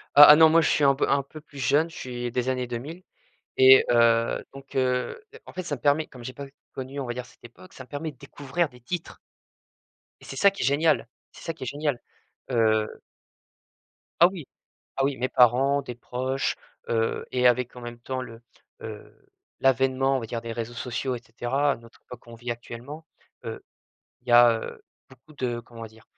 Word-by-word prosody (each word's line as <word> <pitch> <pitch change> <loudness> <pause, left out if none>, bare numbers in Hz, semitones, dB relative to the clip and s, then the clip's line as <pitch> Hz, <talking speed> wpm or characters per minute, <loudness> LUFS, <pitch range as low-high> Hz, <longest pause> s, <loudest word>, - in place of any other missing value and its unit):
Ah 145 +1 +12
ah, 150 - +11
non, 160 0 +7
moi 165 +1 +5
je 160 - +2
suis 150 - +2
un 140 -1 +6
peu 135 - -1
un 140 - +2
peu 155 +3 -12
plus 150 -2 -17
jeune. 145 +5 +2
Je - - -14
suis 120 -1 -5
des 125 0 -1
années 125 -1 -1
2000 145 +10 -7 0.5
et 130 0 +8
heu, 115 -1 +3
donc 135 0 -11
heu, 130 - 0 0.3
en - - -11
fait 185 - -5
ça 155 - -3
me 130 - -10
permet 145 +4 +2
comme 125 -3 -13
j'ai 130 - -6
pas 140 +2 -8
u 135 - -18 0.2
connu 135 +2 -6
on 130 - -4
va 120 - -3
dire 125 0 -6
cette - - -22
époque, 120 +10 -15
ça - - -9
me - - -25
permet 150 +1 -5
de - - -26
découvrir 145 +4 -3
des 125 - -17
titres 165 +8 -6 1.0
et - - -14
c'est - - -8
ça 200 -1 +5
qui 195 - -7
est - - +1
génial! 150 -1 +2 0.3
C'est - - -14
ça 165 - -2
qui 155 - -10
est 130 - -5
génial, 145 -2 -2 0.5
heu 110 -2 +1 1.2
Ah 170 - +8
oui, 180 -6 -7 0.5
ah 135 - +1
oui, 140 -1 0
mes 130 +1 -1
parents, 130 +4 +4
des 125 - -7
proches, 130 +3 -2 0.3
heu 115 -1 -1
et 125 -1 +2
avec 125 0 +2
en - - -8
même 120 0 -8
temps, 130 +2 -4
le, 115 -2 -11 0.4
heu, - - -9 0.5
l'avènement 135 +1 +2
on 130 - -2
va 115 - -6
dire 115 +1 -4
des 115 0 -6
réseaux 115 0 -5
sociaux 125 +2 -3
et 120 - -6
cetera, 130 +5 0
à - - -4
notre 115 0 -18
époque 125 - -11
qu'on 115 0 -13
vit 120 +1 -6
actuellement, 120 +7 -8 0.4
heu, - - -6 0.6
il - - -21
y - - +2
a, 120 0 +8
heu, - - -9 0.3
beaucoup 155 +6 -19
de 120 -3 -3
comment 115 -1 -10
dire? 110 0 -18
130 Hz, 220 wpm, -26 LUFS, 120-145 Hz, 1.2 s, Ah